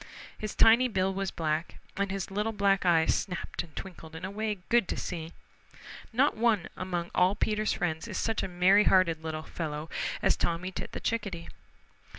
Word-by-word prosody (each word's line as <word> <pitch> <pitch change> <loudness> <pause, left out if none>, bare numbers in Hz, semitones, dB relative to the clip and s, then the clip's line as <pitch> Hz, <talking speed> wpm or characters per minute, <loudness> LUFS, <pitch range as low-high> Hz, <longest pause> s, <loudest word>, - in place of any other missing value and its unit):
His 215 -1 -5
tiny 235 +3 +6
bill 190 -4 0
was 195 0 -2
black, 160 0 -2 0.2
and 200 0 -1
his 195 -1 -4
little 210 +3 -1
black 195 -2 +2
eyes 165 -2 +4
snapped 180 -3 -3
and 165 -3 -14
twinkled 165 -4 -8
in 170 +3 -5
a 190 - -5
way 210 0 -2
good 235 -5 +4
to - - -3
see. 165 -2 -5 0.8
Not 260 +5 +3
one 220 -5 +2
among 175 -2 -3
all 185 +2 +3
Peter's 215 0 0
friends 160 -4 -2
is - - -4
such 225 -1 0
a - - -2
merry 185 +3 +4
hearted 170 -4 +3
little 155 -1 -4
fellow 155 -1 -5 0.3
as - - +4
Tommy 175 +2 -1
Tit - - -6
the - - -4
Chickadee. 200 -7 -3
185 Hz, 180 wpm, -29 LUFS, 170-210 Hz, 0.8 s, tiny